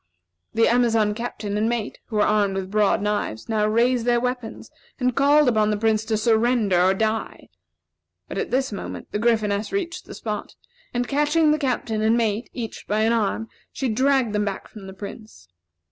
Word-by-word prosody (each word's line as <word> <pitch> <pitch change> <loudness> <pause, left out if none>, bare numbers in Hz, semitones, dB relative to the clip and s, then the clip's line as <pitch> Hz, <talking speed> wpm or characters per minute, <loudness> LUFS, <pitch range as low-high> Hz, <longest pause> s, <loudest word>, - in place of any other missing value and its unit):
The 225 - +4
Amazon 230 -3 +3
Captain 210 -2 -4
and 220 +2 +1
mate, 235 -2 -3
who 225 - -7
were 210 - +4
armed 205 -2 +2
with 190 0 -4
broad 210 -1 +2
knives, 205 - -2
now 215 -1 +1
raised 235 +2 +2
their 240 0 +2
weapons, 250 -2 -4 0.3
and 250 -1 +1
called 290 +1 +4
upon 215 -3 +3
the 210 - 0
Prince 220 0 +1
to 220 -1 0
surrender 220 -4 +2
or 190 +1 +4
die. 220 +1 -2 0.8
But - - -4
at - - -2
this 260 +1 0
moment, 200 - -7
the 210 - -2
Gryphoness 215 -2 +1
reached 375 -4 -3
the - - -10
spot, - - -5 0.4
and 245 0 -1
catching 295 +2 +2
the 305 - +1
Captain 245 -5 -1
and 220 +2 +3
mate, 225 0 -1
each 230 -3 -6
by 210 +1 +1
an 225 +1 +3
arm, 225 0 0 0.2
she 265 - -2
dragged 260 0 +2
them 210 0 +1
back 200 -2 -4
from 200 -3 -11
the 190 - -8
Prince. 200 - -10
225 Hz, 190 wpm, -23 LUFS, 210-245 Hz, 0.8 s, The